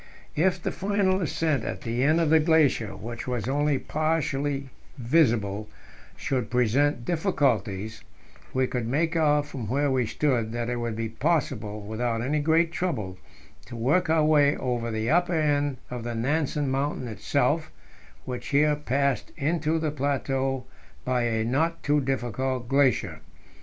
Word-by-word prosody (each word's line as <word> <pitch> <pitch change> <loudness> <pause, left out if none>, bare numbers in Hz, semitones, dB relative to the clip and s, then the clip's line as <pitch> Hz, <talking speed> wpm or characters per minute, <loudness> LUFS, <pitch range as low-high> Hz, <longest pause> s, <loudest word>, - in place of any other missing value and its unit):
If 180 +3 +2
the - - -2
final 195 -1 +1
ascent 155 -5 0
at 95 - -4
the 120 +2 -2
end 155 +4 +4
of 160 -2 +2
the 160 - +7
glacier, 150 - +2
which 120 +2 -7
was 125 -3 -2
only 145 +1 +1
partly 145 -3 -1 0.3
visible, 115 -7 +1 0.5
should 125 -5 -2
present 125 +2 +2
difficulties, 115 - 0 0.5
we 130 0 +1
could 125 -2 -3
make 160 +6 0
out 150 -2 +3
from 130 -7 -6
where 140 +3 +1
we 125 -3 +1
stood 120 -5 0
that 120 0 -2
it 120 - -1
would 120 -2 -3
be 115 0 -2
possible, 115 -5 -1
without 115 +2 -2
any 150 +4 0
great 160 +2 +2
trouble, 110 - -3 0.5
to - - -8
work 140 +10 +1
our 160 -1 +3
way 145 -2 +4
over 120 -2 -2
the 110 +2 -1
upper 175 +1 +2
end 145 -3 +1
of 125 -2 -4
the 120 0 -4
Nansen 145 +3 0
Mountain 135 -1 -1
itself, 110 -3 0 0.5
which 125 -1 -5
here 150 +1 +3
passed 140 -2 -1
into 160 +2 0
the 155 -2 -1
plateau 135 -2 -1 0.4
by 125 -1 +1
a 110 -1 0
not 160 +8 0
too 150 0 +2
difficult 130 -1 -2
glacier. 135 0 +2
135 Hz, 150 wpm, -26 LUFS, 120-150 Hz, 0.5 s, the